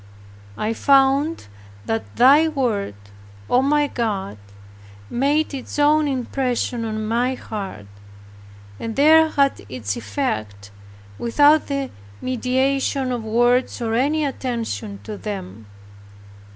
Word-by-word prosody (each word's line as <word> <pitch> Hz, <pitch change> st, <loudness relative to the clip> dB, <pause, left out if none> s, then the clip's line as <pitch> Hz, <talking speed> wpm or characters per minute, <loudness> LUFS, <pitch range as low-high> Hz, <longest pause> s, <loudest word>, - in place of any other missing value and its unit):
I 215 Hz, -, -1 dB
found 275 Hz, +5 st, +3 dB, 0.4 s
that 225 Hz, 0 st, -3 dB
Thy 280 Hz, +6 st, +6 dB
Word, 235 Hz, -, -1 dB, 0.5 s
O 250 Hz, -, +3 dB
my 295 Hz, +2 st, +2 dB
God, 205 Hz, -, -3 dB, 0.7 s
made 290 Hz, +5 st, +1 dB
its 270 Hz, +1 st, -6 dB
own 300 Hz, +1 st, +4 dB
impression 250 Hz, -2 st, -2 dB
on 215 Hz, -1 st, -3 dB
my 240 Hz, +4 st, 0 dB
heart, 195 Hz, -, -7 dB, 0.9 s
and 225 Hz, -1 st, -5 dB
there 315 Hz, +2 st, +6 dB
had 280 Hz, -2 st, +1 dB
its 110 Hz, -6 st, -3 dB
effect, 100 Hz, -1 st, -4 dB, 0.5 s
without 290 Hz, +6 st, +4 dB
the 275 Hz, -1 st, -3 dB, 0.3 s
mediation 260 Hz, +1 st, 0 dB
of 240 Hz, -2 st, -3 dB
words 240 Hz, +3 st, +2 dB
or 230 Hz, -2 st, -2 dB
any 290 Hz, +6 st, +1 dB
attention 235 Hz, -6 st, -4 dB
to 215 Hz, -1 st, -7 dB
them. 110 Hz, -, -7 dB
250 Hz, 110 wpm, -21 LUFS, 215-280 Hz, 0.9 s, Thy